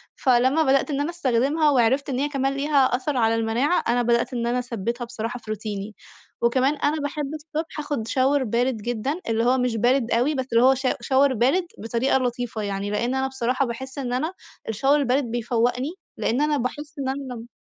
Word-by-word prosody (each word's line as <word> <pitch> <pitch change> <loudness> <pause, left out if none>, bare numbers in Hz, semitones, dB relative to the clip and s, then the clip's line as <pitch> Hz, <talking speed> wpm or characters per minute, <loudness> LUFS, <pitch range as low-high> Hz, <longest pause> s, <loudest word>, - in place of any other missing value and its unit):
فلمّا 260 +4 +3
بدأت 275 +2 +2
إن 280 0 0
أنا 300 - -1
استخدمها 295 0 +1
وعرفت 265 +2 +2
إن 260 -1 -1
هي 290 +1 0
كمان 275 -1 0
ليها 285 +1 0 0.2
أثر 265 +1 -2
على 225 -1 +3
المناعة، 230 +9 +1
أنا 245 +1 +2
بدأت 240 +2 +1
إن 235 -1 -1
أنا 245 +1 +1
اثبتها 240 0 -3
بصراحة 235 +1 -5
في 215 - -8
روتيني. 210 -1 -5 0.5
وكمان 260 +5 +2
أنا 295 +1 0
باحب 285 0 -3
الصبح 310 +1 -5
اخُد 290 -7 -3
شاور 265 +2 +2
بارد 240 +1 0
جدًا، 240 - -3
اللي 225 +1 +1
هو 255 +2 +3
مش 250 -2 0
بارد 240 +1 +2
أوي، 255 +6 +2
بس 260 -1 -1
اللي 230 +2 +5
هو 265 +1 +7
شا 260 0 0
شاور 270 0 +3
بارد 270 - +2
بطريقة 235 +5 +1
لطيفة 245 -3 -2
يعني، 200 0 -3
لإن 240 +5 0
أنا 265 0 0
بصراحة 260 +1 0
باحس 260 +3 -6
إن 250 -3 -3
أنا 315 +8 -1 0.4
الشاور 270 +7 +2
البارد 270 +1 +2
بيفوقني 240 +4 -1 0.3
لإن 250 +6 0
أنا 300 -1 +2
باحس 290 +4 -5
إن 265 -1 -1
أنا 265 -2 -4
لم 230 0 -9
255 Hz, 200 wpm, -24 LUFS, 235-280 Hz, 0.5 s, هو